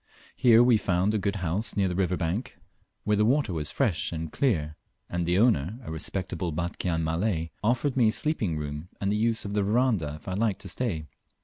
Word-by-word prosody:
Here 120 -2 +6
we 120 -2 +5
found 95 +1 +1
a 110 - +1
good 100 +1 -1
house 95 +9 -1
near 100 -1 +3
the 90 - -2
river 90 -1 0
bank, 95 +9 -3 0.5
where 105 - +2
the 105 - +3
water 130 -2 +2
was 75 -2 -2
fresh 100 - 0
and 80 -1 -4
clear, 80 - 0 0.3
and 85 0 -2
the 90 +2 +2
owner, 105 - +2
a 80 - -7
respectable 85 +1 -3
Batchian 85 0 -2
Malay, 80 0 -1
offered 125 +5 +1
me 120 -4 +4
sleeping 110 - -1
room 75 +3 -5
and 100 0 0
the - - +1
use 115 +1 +1
of 100 - -4
the 105 - +2
verandah 105 - +1
if 75 - -15
I 95 - -2
liked 105 0 0
to - - -7
stay. 95 -12 -2
95 Hz, 205 wpm, -27 LUFS, 80-110 Hz, 0.5 s, Here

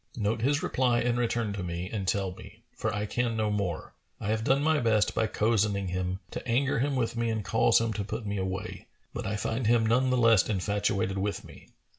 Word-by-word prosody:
Note 110 0 0
his 140 +4 +1
reply 125 -2 +2
and 120 0 0
return 115 -3 0
to 100 - -4
me 85 0 -4
and 100 -2 -4
tell 95 -1 0
me; 90 - -13
for 110 - -2
I 105 0 -2
can 115 +1 -1
no 110 -1 0
more: 100 -6 -3 0.3
I - - -4
have 110 0 0
done 135 +4 +2
my 160 0 +3
best, 110 -4 +2
by 110 - +1
cozening 105 -3 +1
him, 90 +1 -2
to - - -6
anger 125 +2 +1
him 140 +2 0
with 120 -2 -1
me 115 0 0
and 110 -2 -2
cause 110 +3 +4
him 115 -1 -1
to 105 - -3
put 105 +3 -5
me 100 0 -2
away, 95 0 -4 0.3
but - - -4
I 100 - -1
find 115 +2 -1
him 115 -1 +4
none 125 +4 +3
the 125 - +2
less 115 -4 +4
infatuated 100 -1 0
with 100 +1 -2
me. - - -14
110 Hz, 225 wpm, -28 LUFS, 100-120 Hz, 0.3 s, cause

